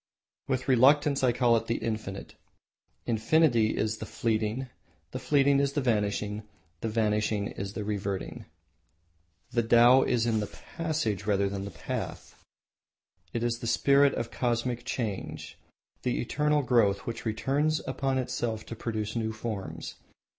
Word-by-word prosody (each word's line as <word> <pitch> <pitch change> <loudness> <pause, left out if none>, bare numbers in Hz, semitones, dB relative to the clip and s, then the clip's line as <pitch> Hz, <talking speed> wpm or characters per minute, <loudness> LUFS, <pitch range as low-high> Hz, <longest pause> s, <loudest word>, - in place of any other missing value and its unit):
With 130 -1 -1
reluctance 140 +2 +4
I 125 - +5
call 120 -1 +3
it 115 0 -4
the 115 - 0
Infinite. 110 -4 -4 0.7
Infinity 115 0 +3
is 110 0 0
the 110 - -6
Fleeting, 110 +3 -1 0.4
the - - -4
Fleeting 140 -1 +3
is 140 0 +1
the 145 - 0
Vanishing, 105 -3 0 0.4
the 115 - -2
Vanishing 105 -2 0
is 100 +1 -6
the 105 - -4
Reverting." 100 -2 -4 1.1
The 120 - +2
Tao 120 +3 +6
is 120 -3 +1
in 115 -2 +1
the 105 - -2
Passage 155 - -3
rather 100 -1 +2
than 100 0 -4
the - - -5 0.2
Path. - - -5 0.9
It 115 - -2
is 120 0 0
the 115 - -5
spirit 140 +4 +4
of 115 0 -3
Cosmic 120 0 -1
Change, 110 -6 -4 0.4
the 125 - -1
eternal 150 +4 +1
growth 110 -6 +2
which 115 -1 -5
returns 140 +8 0
upon 135 -1 -1
itself 120 -3 -2
to 115 - -7
produce 110 -1 -3
new 110 -1 -1
forms. 110 -3 -6
115 Hz, 145 wpm, -28 LUFS, 110-130 Hz, 1.1 s, Tao